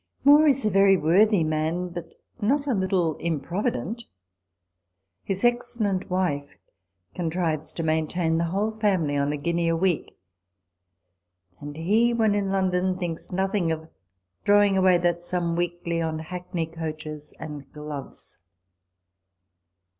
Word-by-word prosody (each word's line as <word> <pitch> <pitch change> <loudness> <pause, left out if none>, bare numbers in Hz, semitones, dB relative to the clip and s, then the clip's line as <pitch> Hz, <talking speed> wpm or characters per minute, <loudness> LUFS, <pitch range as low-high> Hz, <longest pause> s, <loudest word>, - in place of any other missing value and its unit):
Moore 295 +3 +7
is 275 -5 +2
a 215 - +2
very 195 0 +5
worthy 185 +4 +4
man, 160 +3 -1
but 170 -1 -8 0.3
not 280 +7 +1
a 275 - +1
little 185 -5 +1
improvident. 170 - -2 1.2
His 195 +2 -3
excellent 240 -5 0
wife 160 -6 -1 0.6
contrives 160 -3 -2
to 165 - -4
main 160 0 +1
tain 165 -1 0
the 170 - +1
whole 200 +6 0
family 195 -9 0
on 140 0 +1
a 150 - -2
guinea 170 +3 0
a 165 - +2
week; 175 -1 -1 1.4
and 145 +1 -8
he, 220 +8 +2
when 220 -3 +3
in 200 -1 0
London, 185 -1 +1
thinks 175 -2 -5
nothing 190 -2 0
of 160 0 -4 0.5
throwing 205 -1 +4
away 185 -1 +5
that 175 0 0
sum 175 -1 -2
weekly 175 -1 -2
on 160 -1 -2
hackney 175 +1 -4
coaches 155 -2 -7
and 150 -3 -8
gloves. 150 -2 -9
175 Hz, 130 wpm, -25 LUFS, 160-195 Hz, 1.4 s, Moore